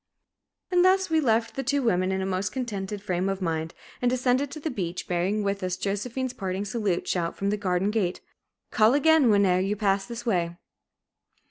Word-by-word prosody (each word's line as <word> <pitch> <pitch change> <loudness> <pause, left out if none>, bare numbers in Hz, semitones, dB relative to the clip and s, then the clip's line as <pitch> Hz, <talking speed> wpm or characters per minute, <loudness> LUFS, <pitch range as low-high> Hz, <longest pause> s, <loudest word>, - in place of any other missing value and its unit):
And 355 -1 +4
thus 375 -1 +3
we 320 - +4
left 225 -3 +1
the 270 - -3
two 280 0 0
women 185 -5 +1
in 190 0 -1
a - - -2
most 190 +1 -1
contented 205 -5 -4
frame 185 -1 -1
of 195 -1 -2
mind, 165 -3 -2 0.3
and 245 - +3
descended 255 +2 +1
to 310 - -8
the 310 +1 -3
beach, 180 -6 -4
bearing 185 +4 0
with 200 0 -1
us 185 -1 -2
Josephine's 235 +7 -3
parting 190 -1 -3
salute, 205 -4 -1
shouted 170 -2 -1
from 200 0 0
the - - +1
garden 195 -1 0
gate, 195 -5 -1 0.5
"Call 220 +4 +4
agin, 315 -3 +5
whene'er 200 -3 +4
ye 195 +3 0
pass 195 -2 0
this 235 0 -7
way!" 175 -6 0
200 Hz, 195 wpm, -26 LUFS, 185-245 Hz, 0.5 s, agin